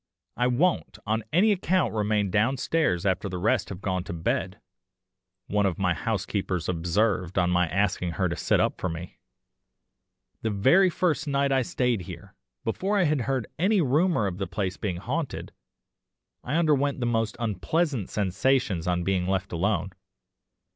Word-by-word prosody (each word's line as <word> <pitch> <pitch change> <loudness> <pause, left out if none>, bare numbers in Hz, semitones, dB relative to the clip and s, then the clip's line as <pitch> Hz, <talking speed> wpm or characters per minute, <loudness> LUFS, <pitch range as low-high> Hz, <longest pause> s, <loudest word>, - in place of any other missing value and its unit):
"'I 125 - +1
won't 155 +9 +1
on 110 +1 0
any 200 +6 +4
account 185 - +1
remain 105 -2 0
downstairs 115 - +1
after 95 +1 0
the 90 - -4
rest 95 0 +1
have 95 -1 -7
gone 95 -2 -1
to 85 - -5
bed,' 90 +3 -2 0.9
one 105 0 +1
of 90 - -2
my 90 -2 +1
housekeepers 95 -2 -2
observed 90 +2 0
on 90 -1 +3
my 90 0 +3
asking 90 -1 0
her 95 +1 0
to 85 - -2
sit - - +1
up - - 0
for 90 - 0
me, 85 +2 -7 1.2
'the 110 - -1
very 135 - +4
first 160 -2 0
night 140 -1 +1
I 135 -1 +3
stayed 125 -3 0
here 85 - -10 0.3
before 195 - 0
I 195 - +4
had 150 -4 +1
heard 130 -1 -1
any 200 +4 +3
rumour 155 - +2
of 95 -1 -3
the 95 - -2
place 95 0 -2
being 95 -4 -3
haunted 135 - -4 0.9
I 140 - -2
underwent 145 -4 +2
the 120 - -1
most 115 -2 0
unpleasant 120 - -1
sensations 100 -2 0
on 90 -1 +1
being 90 -1 0
left 95 0 -1
alone. 95 +1 0
105 Hz, 160 wpm, -26 LUFS, 95-135 Hz, 1.2 s, any